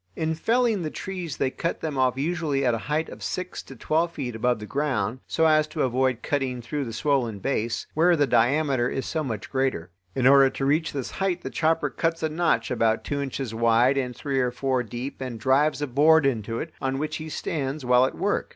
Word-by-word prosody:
In 160 Hz, 0 st, -1 dB
felling 225 Hz, +4 st, +1 dB
the 155 Hz, -, -2 dB
trees 180 Hz, -3 st, -5 dB
they 130 Hz, -, 0 dB
cut 170 Hz, -, -3 dB
them 155 Hz, -3 st, -3 dB
off 130 Hz, -1 st, +2 dB
usually 150 Hz, -2 st, -1 dB
at 120 Hz, -, +3 dB
a 115 Hz, -, -1 dB
height 155 Hz, +2 st, 0 dB
of -, -, -10 dB
six 185 Hz, 0 st, -4 dB
to 135 Hz, -, -12 dB
twelve 160 Hz, +7 st, 0 dB
feet 125 Hz, -7 st, -4 dB
above 120 Hz, +2 st, +1 dB
the 105 Hz, -, -8 dB
ground, 135 Hz, -1 st, -1 dB
so 160 Hz, -, +1 dB
as 155 Hz, -1 st, +4 dB
to 155 Hz, 0 st, -2 dB
avoid 130 Hz, -1 st, 0 dB
cutting 135 Hz, -4 st, -1 dB
through 135 Hz, +5 st, -3 dB
the 115 Hz, -, -5 dB
swollen 125 Hz, -4 st, 0 dB
base, 115 Hz, +1 st, -2 dB
where 170 Hz, +3 st, +4 dB
the 145 Hz, -3 st, +3 dB
diameter 130 Hz, 0 st, +2 dB
is 135 Hz, -, -3 dB
so 160 Hz, -1 st, -2 dB
much 110 Hz, -7 st, -5 dB
greater. 130 Hz, -11 st, -1 dB, 0.2 s
In 130 Hz, -, 0 dB
order 135 Hz, 0 st, +7 dB
to 135 Hz, -, -3 dB
reach 155 Hz, +4 st, +1 dB
this 135 Hz, -4 st, -4 dB
height 185 Hz, -2 st, -1 dB
the -, -, -5 dB
chopper 165 Hz, 0 st, +1 dB
cuts 165 Hz, -1 st, -1 dB
a 160 Hz, -, +1 dB
notch 170 Hz, -2 st, 0 dB
about 115 Hz, -2 st, +1 dB
two 140 Hz, -1 st, -2 dB
inches 135 Hz, -3 st, -4 dB
wide 115 Hz, +3 st, +3 dB
and 125 Hz, -3 st, -2 dB
three 135 Hz, 0 st, -2 dB
or 125 Hz, -1 st, +2 dB
four 130 Hz, +1 st, -1 dB
deep 120 Hz, +4 st, -6 dB
and 125 Hz, -3 st, -5 dB
drives 145 Hz, +5 st, +2 dB
a -, -, -1 dB
board 150 Hz, +4 st, +5 dB
into 115 Hz, -4 st, -1 dB
it, 160 Hz, -, -5 dB
on 135 Hz, 0 st, -1 dB
which 155 Hz, +2 st, -2 dB
he 155 Hz, 0 st, -7 dB
stands 145 Hz, -3 st, -3 dB
while 125 Hz, +1 st, +5 dB
at -, -, -7 dB
work. 205 Hz, +1 st, -1 dB
135 Hz, 225 wpm, -25 LUFS, 125-155 Hz, 0.2 s, order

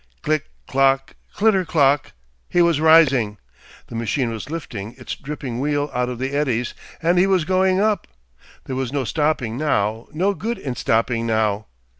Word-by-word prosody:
Click, 155 Hz, -1 st, 0 dB, 0.2 s
clock, 135 Hz, 0 st, +2 dB, 0.2 s
clitter 205 Hz, -3 st, +3 dB
clock, 145 Hz, -4 st, +2 dB, 0.4 s
he 175 Hz, -, +1 dB
was 170 Hz, -3 st, +3 dB
rising! 140 Hz, -10 st, +5 dB, 0.5 s
The -, -, -12 dB
machine 115 Hz, +2 st, -1 dB
was 115 Hz, +4 st, -6 dB
lifting 120 Hz, -10 st, -6 dB
its -, -, -6 dB
dripping 135 Hz, -4 st, -6 dB
wheel 145 Hz, +1 st, 0 dB
out 125 Hz, 0 st, 0 dB
of 125 Hz, -, -5 dB
the 130 Hz, +2 st, -3 dB
eddies, 125 Hz, -5 st, 0 dB, 0.3 s
and 175 Hz, +2 st, +3 dB
he 190 Hz, -, +4 dB
was 185 Hz, -5 st, +2 dB
going 185 Hz, +1 st, +2 dB
up! 210 Hz, 0 st, +1 dB, 0.6 s
There 130 Hz, -, -4 dB
was 130 Hz, -2 st, -2 dB
no 140 Hz, -1 st, -1 dB
stopping 140 Hz, -5 st, 0 dB
now, 110 Hz, -7 st, 0 dB
no 185 Hz, +6 st, +1 dB
good 230 Hz, +4 st, -3 dB
in 135 Hz, -9 st, -5 dB
stopping 115 Hz, 0 st, 0 dB
now. 110 Hz, -2 st, 0 dB
140 Hz, 165 wpm, -21 LUFS, 120-165 Hz, 0.6 s, rising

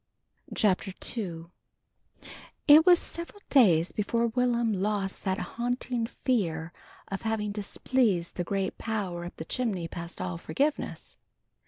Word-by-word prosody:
CHAPTER 195 Hz, -1 st, +2 dB, 0.2 s
II 170 Hz, -8 st, -4 dB, 1.2 s
IT 310 Hz, +3 st, +8 dB
was 355 Hz, -1 st, +9 dB
several 340 Hz, +5 st, -5 dB
days 180 Hz, -, +5 dB
before 230 Hz, +3 st, 0 dB
Will'm 240 Hz, -1 st, +1 dB
lost 195 Hz, 0 st, -1 dB
that 190 Hz, -1 st, +1 dB
haunting 240 Hz, 0 st, -2 dB
fear 170 Hz, -11 st, -1 dB, 0.4 s
of 195 Hz, -, -4 dB
having 220 Hz, -2 st, -1 dB
displeased 205 Hz, -2 st, 0 dB
the 175 Hz, -, -1 dB
great 195 Hz, +2 st, -2 dB
power 195 Hz, -6 st, -3 dB
up 175 Hz, -, -8 dB
the 160 Hz, -, -7 dB
chimney 200 Hz, -7 st, -1 dB
past 170 Hz, +1 st, -8 dB
all 90 Hz, -2 st, -3 dB
forgiveness. 290 Hz, -, -2 dB
210 Hz, 125 wpm, -28 LUFS, 175-240 Hz, 1.2 s, was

